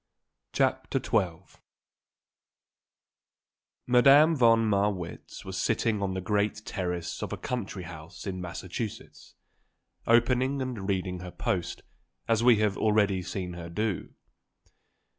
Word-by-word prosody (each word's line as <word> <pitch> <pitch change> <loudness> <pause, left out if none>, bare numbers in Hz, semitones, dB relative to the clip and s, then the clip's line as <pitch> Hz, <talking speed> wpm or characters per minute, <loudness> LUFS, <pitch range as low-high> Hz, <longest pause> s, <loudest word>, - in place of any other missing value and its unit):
CHAPTER - - 0
XII 95 -5 -2 2.3
Madame 140 +6 +6
von 115 -4 +5
Marwitz 100 -4 -2
was 95 -1 -4
sitting 110 -3 0
on 95 -1 -1
the 95 - -2
great 105 +1 -1
terrace 90 -4 -3
of - - -4
a - - -3
country 105 -6 -4
house 85 0 -10
in 95 -2 -4
Massachusetts, 95 +5 -7 0.7
opening 125 +4 +3
and 120 -7 -4
reading 90 -2 -1
her 90 0 -7
post, 90 0 -3 0.4
as 115 0 +2
we 120 -1 +7
have 105 -2 0
already 105 -3 +2
seen 90 -1 -5
her 85 -1 -7
do. 105 +2 -3
100 Hz, 115 wpm, -28 LUFS, 90-115 Hz, 2.3 s, we